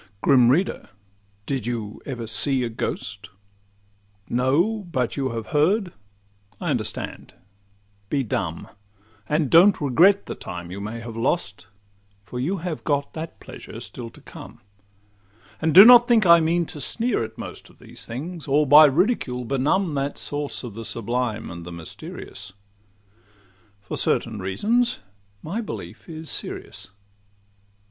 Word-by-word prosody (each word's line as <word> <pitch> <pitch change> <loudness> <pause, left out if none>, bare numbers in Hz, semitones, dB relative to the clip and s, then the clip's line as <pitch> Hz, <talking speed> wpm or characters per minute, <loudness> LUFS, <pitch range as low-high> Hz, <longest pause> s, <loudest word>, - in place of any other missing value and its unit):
Grim 125 -3 +5
reader! 170 +9 0 0.6
did 130 -5 -3
you 110 -4 -4
ever 125 -4 -4
see 130 +4 +3
a 120 - -2
ghost? 100 -4 -5 1.0
No; 160 - +1
but 125 -6 -1
you 135 -2 -1
have 115 -2 -5
heard—I 100 - -2
understand—be 100 +5 -6
dumb! 85 -7 -3 0.6
And 150 -3 +1
don't 185 +5 +6
regret 170 +9 +4
the - - -5
time 90 0 -8
you 100 +2 -6
may 110 +3 -5
have 115 -1 -8
lost, 115 - -2 0.6
For 125 +5 -7
you 170 +10 -1
have 165 -4 -4
got 145 -2 -1
that 160 0 -7
pleasure - - -10
still 120 -2 -8
to - - -17
come: - - -12 1.0
And 160 - +2
do 190 +6 +10
not 240 0 +9
think 230 -4 +4
I 170 -1 +8
mean 165 +1 +1
to 150 - -9
sneer 235 - -1
at 110 0 -8
most - - -9
Of - - -21
these - - -10
things, 155 +8 -7
or 145 +2 +3
by 150 +3 +9
ridicule 145 - +1
benumb 145 +8 0
That 140 0 -2
source 145 -1 -3
of 120 -4 -7
the 115 +2 -7
sublime 115 0 -2
and 85 0 -8
the 85 - -9
mysterious:— 85 +2 -9 1.3
For - - -6
certain 110 -3 0
reasons 220 - 0 0.4
my 195 +9 -3
belief 210 - -8
is 160 -1 -7
serious. - - -6
130 Hz, 140 wpm, -23 LUFS, 110-165 Hz, 1.3 s, do